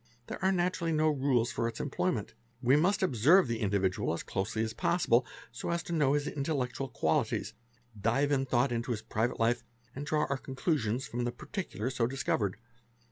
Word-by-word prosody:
There - - -7
are 190 - +4
naturally 175 -2 0
no 155 0 +3
rules 130 -5 +1
for 115 - -1
its 115 - -5
employment. - - -1 0.3
We 125 +3 +4
must 190 +7 +2
observe 155 - +5
the 115 -1 -2
individual 95 -2 0
as - - -5
closely 110 +3 -2
as 110 0 -3
possible 130 -7 +2 0.2
so 115 - -5
as 170 0 -1
to 170 - -5
know 145 -4 +3
his 145 0 0
intellectual 135 -3 -2
qualities, 80 -7 0 0.5
dive 135 +7 +2
in 135 -1 +1
thought 125 +1 +2
into 115 +1 -2
his 110 - -5
private 115 +3 -1
life, 115 +1 +2 0.3
and 140 - -4
draw 150 +1 +1
our 140 - -1
conclusions 130 - -1
from 120 +1 -3
the 120 - -1
particulars 130 - -5
so 115 - +3
discovered. 115 -6 -1
130 Hz, 185 wpm, -31 LUFS, 115-150 Hz, 0.5 s, observe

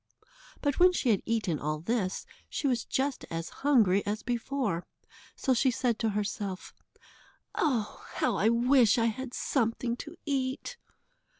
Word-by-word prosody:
But 285 -2 +1
when 360 +1 +7
she 265 - 0
had 200 - +2
eaten 215 -9 0
all 150 +1 -2
this, 190 +1 -1 0.2
she - - -3
was 245 -4 +1
just 270 0 -1
as 165 0 -4
hungry 220 -9 +4
as 210 +1 -3
before, 240 -6 -1 0.5
so 265 - +1
she 260 +2 +3
said 245 -2 0
to 225 - +1
herself: 200 -2 -3 0.8
"Oh! 245 -9 -1
how - - +1
I 215 - +3
wish 240 0 +4
I 230 - +3
had 245 +3 -3
something 235 -1 0
to - - -9
eat." 275 - -2
235 Hz, 145 wpm, -29 LUFS, 205-265 Hz, 0.8 s, when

